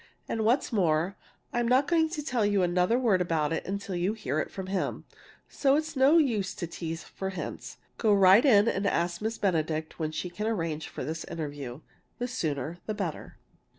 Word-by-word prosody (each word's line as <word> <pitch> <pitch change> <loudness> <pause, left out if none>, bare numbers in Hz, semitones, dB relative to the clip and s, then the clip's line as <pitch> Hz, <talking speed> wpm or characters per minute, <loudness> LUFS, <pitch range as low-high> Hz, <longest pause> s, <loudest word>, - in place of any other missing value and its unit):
And 225 - -1
what's 240 +3 +2
more, 175 -1 +2 0.4
I'm 240 -1 +1
not 260 +4 +4
going 320 0 +3
to 310 -2 -4
tell 250 -6 0
you 205 -2 +2
another 180 +6 +2
word 220 -8 +2
about 165 -3 0
it 160 - -3
till 200 - -6
you 180 +4 0
hear 155 - -2
it - - -2
from 190 - -6
him, 190 0 -2 0.4
so 275 -1 +2
it's 310 +1 -2
no 275 +5 +5
use 215 - +1
to 175 - -4
tease 165 0 -5
for 190 - -5
hints! 190 - -6 0.2
Go 220 - +3
right 195 +2 +7
in 220 -6 +6
and 200 -3 +1
ask 170 -1 0
Miss 220 +1 -2
Benedict 160 -5 -1
when 155 -1 -1
she 175 +3 -4
can 210 +5 -3
arrange 165 -8 -2
for - - -6
this 160 +4 -4
interview 145 -4 -6 0.4
the 245 - -2
sooner, 165 - -3
the 215 - -2
better!" 185 -7 -5
190 Hz, 195 wpm, -28 LUFS, 165-230 Hz, 0.4 s, right